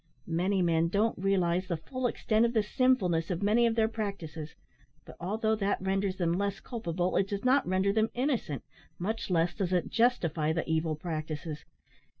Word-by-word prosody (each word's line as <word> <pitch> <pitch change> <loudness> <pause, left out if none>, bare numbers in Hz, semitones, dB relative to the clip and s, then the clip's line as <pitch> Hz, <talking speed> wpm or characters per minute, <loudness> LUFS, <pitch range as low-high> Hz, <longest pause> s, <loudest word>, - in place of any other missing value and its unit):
Many 185 +3 +1
men 165 -1 +2
don't 205 +6 +1
realise 185 -2 +1
the 170 -3 -1
full 255 +10 -3
extent 220 -1 +1
of 235 0 +2
the 220 -3 +3
sinfulness 205 -9 +2
of 180 +1 -2
many 230 +4 +4
of 225 - 0
their 220 -1 +3
practices, 190 -9 -5 0.5
but - - -12
although 220 +5 0
that 200 -1 0
renders 195 0 0
them 170 -2 +1
less 200 +1 -1
culpable, 180 -6 -2
it 195 - +2
does 200 +3 -4
not 265 +2 +4
render 190 +2 +2
them 220 +1 +2
innocent, 245 - -1 0.3
much 220 +5 -3
less 175 -1 +2
does 190 -3 -2
it 180 - +1
justify 170 -10 +2
the 165 - -2
evil 160 -1 0
practices. 155 -1 -5
190 Hz, 175 wpm, -30 LUFS, 170-220 Hz, 0.5 s, many